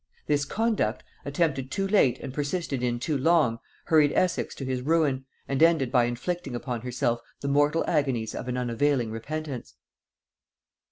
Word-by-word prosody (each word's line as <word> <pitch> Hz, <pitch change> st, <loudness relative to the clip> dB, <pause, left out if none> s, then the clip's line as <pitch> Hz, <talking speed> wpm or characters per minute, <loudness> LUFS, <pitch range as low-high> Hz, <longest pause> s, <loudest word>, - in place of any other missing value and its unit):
This 145 Hz, -1 st, +1 dB
conduct, 205 Hz, -, 0 dB, 0.2 s
attempted 140 Hz, -3 st, 0 dB
too 195 Hz, +4 st, -1 dB
late 195 Hz, -, +4 dB
and 130 Hz, -, -6 dB
persisted 145 Hz, -1 st, -2 dB
in 120 Hz, -1 st, 0 dB
too 145 Hz, +5 st, -2 dB
long, 145 Hz, -5 st, +3 dB, 0.3 s
hurried 150 Hz, -3 st, +4 dB
Essex 185 Hz, -, 0 dB
to 135 Hz, -, -6 dB
his 130 Hz, -1 st, -2 dB
ruin, 140 Hz, -2 st, +1 dB, 0.2 s
and 135 Hz, +1 st, -1 dB
ended 160 Hz, -7 st, +4 dB
by 125 Hz, -3 st, +4 dB
inflicting 130 Hz, +4 st, -3 dB
upon 120 Hz, -1 st, -4 dB
herself 120 Hz, -1 st, -1 dB, 0.2 s
the 140 Hz, -, -3 dB
mortal 145 Hz, +3 st, +2 dB
agonies 135 Hz, -8 st, 0 dB
of -, -, -5 dB
an 125 Hz, 0 st, -2 dB
unavailing 125 Hz, 0 st, +1 dB
repentance. 140 Hz, +4 st, -5 dB
140 Hz, 155 wpm, -27 LUFS, 125-155 Hz, 0.3 s, late